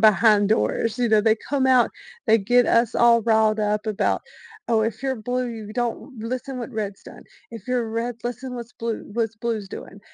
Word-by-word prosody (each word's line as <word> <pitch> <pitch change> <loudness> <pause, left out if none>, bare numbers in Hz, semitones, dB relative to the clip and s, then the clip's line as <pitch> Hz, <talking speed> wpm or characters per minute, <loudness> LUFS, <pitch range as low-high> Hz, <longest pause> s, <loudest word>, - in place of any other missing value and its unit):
behind 215 -1 +5
doors, 225 +1 +1
you 245 -1 +2
know? 215 -1 +4
They 220 0 +4
come 275 -2 +1
out, 255 -2 +4 0.4
they 220 -1 +6
get 245 +4 +3
us 230 0 +3
all 235 -1 +5
riled 220 -1 +3
up 210 0 0
about, 215 -1 0 0.5
"Oh, 225 -2 +3
if 220 +1 -3
you're 265 -1 -1
blue, 230 -2 -4
don't 240 +2 -3
listen 255 +3 -4
what 240 - -5
reds 205 -3 -4
done. - - -12 0.3
If 230 -4 -10
you're 250 -2 0
red, 230 +1 -3
listen 245 +1 -5
what's 240 -1 -8
blue 230 -1 -4
what's 225 -1 -1
blue's 225 -2 -3
doing," 195 0 -9
230 Hz, 190 wpm, -23 LUFS, 215-245 Hz, 0.5 s, they